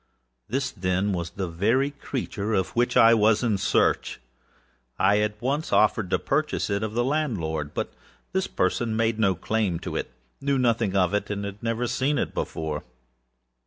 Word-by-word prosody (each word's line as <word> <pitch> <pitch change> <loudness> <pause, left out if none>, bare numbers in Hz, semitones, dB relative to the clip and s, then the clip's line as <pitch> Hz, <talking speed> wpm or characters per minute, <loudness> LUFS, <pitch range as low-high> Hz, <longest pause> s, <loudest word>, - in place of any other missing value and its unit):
This, 130 +2 -1
then, 95 +1 0
was 85 -2 -3
the 95 +1 -4
very 110 +12 +1
creature 115 -6 -3
of 95 -1 +1
which 120 +1 +2
I 115 +1 +8
was 110 +1 +4
in 110 -5 +1
search. - - +1 0.8
I 100 +2 +4
at 105 0 -1
once 140 +6 -1
offered 105 -2 +3
to - - +2
purchase 145 -6 -1
it 100 0 0
of 110 0 -3
the 120 - +2
landlord; 95 - -1
but - - -3 0.4
this 190 0 0
person 115 -2 0
made 115 0 +1
no 100 -4 +3
claim 105 -1 -1
to - - -5
itâknew 65 - -3
nothing 115 -5 +1
of 95 -1 +3
itâhad 100 -1 -2
never 115 +1 -1
seen 135 +4 0
it - - -1
before. 80 -2 -3
110 Hz, 165 wpm, -25 LUFS, 95-120 Hz, 0.8 s, I